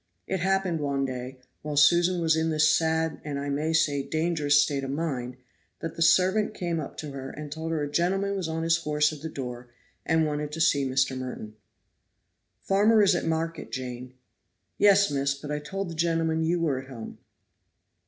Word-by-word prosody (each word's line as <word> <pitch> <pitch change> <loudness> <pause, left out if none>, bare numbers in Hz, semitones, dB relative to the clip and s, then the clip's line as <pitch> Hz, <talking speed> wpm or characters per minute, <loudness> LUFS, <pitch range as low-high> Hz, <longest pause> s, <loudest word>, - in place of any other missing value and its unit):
It 190 - -2
happened 190 -2 0
one 140 -2 -1
day, 130 0 -6 0.2
while 150 -1 -4
Susan 175 +4 +4
was 160 -1 +3
in 160 0 0
this 155 -1 +4
sad 160 -1 0
and 145 -2 -4
I 140 0 -3
may 150 +3 -1
say 150 -3 +2
dangerous 155 -1 +1
state 145 -1 +1
of 135 - -4
mind, 135 -4 -3 0.4
that 165 - -5
the - - -6
servant 185 +6 +3
came 170 -2 -2
up 150 - -7
to 150 -2 -6
her, 135 -1 -6
and 150 0 -8
told 160 +2 -4
her 155 -2 -1
a - - -2
gentleman 190 +6 0
was 185 -4 -2
on 160 0 -3
his 165 0 +3
horse 150 -2 +1
at 150 - -10
the 160 - -5
door, 125 -4 -7 0.3
and 160 0 +2
wanted 150 0 -3
to 165 - -5
see 140 -5 +2
Mr. 130 0 +1
Merton. 125 -4 -6 1.1
"Father 210 +2 +4
is 200 -1 +5
at 175 - -1
market, 165 0 -2
Jane." 125 0 -6 0.6
"Yes, 200 -3 +5
miss, 140 0 0
but 145 +1 -8
I 150 - -1
told 195 +6 -5
the 170 - -6
gentleman 165 0 0
you 170 +2 +1
were 150 -6 0
at 135 - -15
home." 115 -4 -9
155 Hz, 195 wpm, -27 LUFS, 140-165 Hz, 1.1 s, is